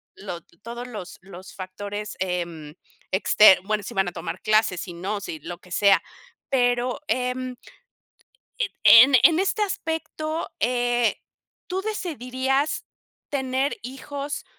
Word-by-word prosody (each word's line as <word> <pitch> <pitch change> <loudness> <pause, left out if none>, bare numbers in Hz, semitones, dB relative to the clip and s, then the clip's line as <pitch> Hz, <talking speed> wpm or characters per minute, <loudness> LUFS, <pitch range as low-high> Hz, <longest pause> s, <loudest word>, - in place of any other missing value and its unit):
Lo 180 -4 -7 0.2
todos 240 +3 -7
los 210 -7 -8
los 185 0 -12
factores, 205 +2 -6
em, 170 -5 -3 0.4
exter 190 +1 +6
bueno, 210 +1 -1
si - - -7
van 195 -1 +1
a - - -2
tomar 165 +1 -5
clases, 215 -4 +2
si 180 - -7
no, 195 +5 -3
si 320 - -6
lo 175 - -7
que 180 +1 -20
sea. 200 +1 +4 0.5
Pero, 245 0 +1
em 255 -2 -1 1.0
en - - 0
en 255 +4 +9
en 330 0 +6
este 395 +3 +1
aspecto, 320 -3 -3
eh, 240 -1 +1 0.5
¿tú 375 +1 -2
decidirías 275 - -1 0.4
tener 265 0 -1
hijos, 280 +3 -6
245 Hz, 130 wpm, -24 LUFS, 195-275 Hz, 1.0 s, en